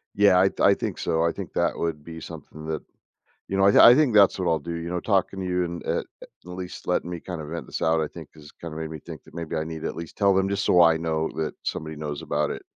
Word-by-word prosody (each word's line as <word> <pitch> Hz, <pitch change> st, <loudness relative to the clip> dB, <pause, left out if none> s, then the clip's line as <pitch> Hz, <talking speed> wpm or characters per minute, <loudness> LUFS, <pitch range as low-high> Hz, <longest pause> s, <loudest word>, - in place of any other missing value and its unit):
Yeah. 100 Hz, -3 st, +5 dB
I 95 Hz, -, +5 dB
th -, -, -18 dB
I 100 Hz, -, +6 dB
think -, -, -4 dB
so. 80 Hz, 0 st, 0 dB
I 85 Hz, -, +2 dB
think -, -, -8 dB
that -, -, 0 dB
would 80 Hz, -3 st, -3 dB
be 80 Hz, +1 st, -9 dB
something 75 Hz, 0 st, -10 dB
that, 80 Hz, -1 st, -3 dB, 0.7 s
you 95 Hz, -, -2 dB
know 95 Hz, -, +3 dB
I 100 Hz, +4 st, +8 dB
I -, -, +7 dB
think 140 Hz, -4 st, +3 dB
that's 100 Hz, -2 st, +6 dB
what 90 Hz, -, -2 dB
I'll 80 Hz, -, +2 dB
do, 85 Hz, +3 st, -6 dB
you 85 Hz, +1 st, -5 dB
know. 90 Hz, 0 st, -2 dB
Talking 95 Hz, -1 st, 0 dB
to 95 Hz, -, -3 dB
you, 90 Hz, 0 st, 0 dB
and 85 Hz, 0 st, -5 dB
at -, -, -1 dB, 0.2 s
at -, -, -10 dB, 0.2 s
least 90 Hz, 0 st, -7 dB
letting -, -, 0 dB
me 90 Hz, -1 st, -4 dB
kind 85 Hz, 0 st, -6 dB
of 75 Hz, -, -7 dB
vent 85 Hz, +2 st, -5 dB
this -, -, -5 dB
out, 80 Hz, 0 st, +2 dB
I -, -, -1 dB
think, -, -, -11 dB
has 75 Hz, -1 st, -14 dB
kind 85 Hz, -2 st, -9 dB
of -, -, -6 dB
made 80 Hz, -1 st, -4 dB
me 80 Hz, -, -6 dB
think 80 Hz, -2 st, -10 dB
that -, -, -17 dB
maybe 85 Hz, -1 st, -4 dB
I 80 Hz, -, -1 dB
need 80 Hz, 0 st, -6 dB
to -, -, -1 dB
at -, -, -7 dB
least 85 Hz, -1 st, -8 dB
tell 100 Hz, -2 st, +4 dB
them, 95 Hz, +1 st, +1 dB
just 100 Hz, 0 st, -1 dB
so 90 Hz, -, +6 dB
I 80 Hz, -1 st, +5 dB
know 80 Hz, -1 st, -1 dB
that 80 Hz, -1 st, -2 dB
somebody 80 Hz, 0 st, -4 dB
knows 75 Hz, -1 st, -5 dB
about 75 Hz, 0 st, -1 dB
it -, -, -5 dB
85 Hz, 300 wpm, -25 LUFS, 80-95 Hz, 0.7 s, I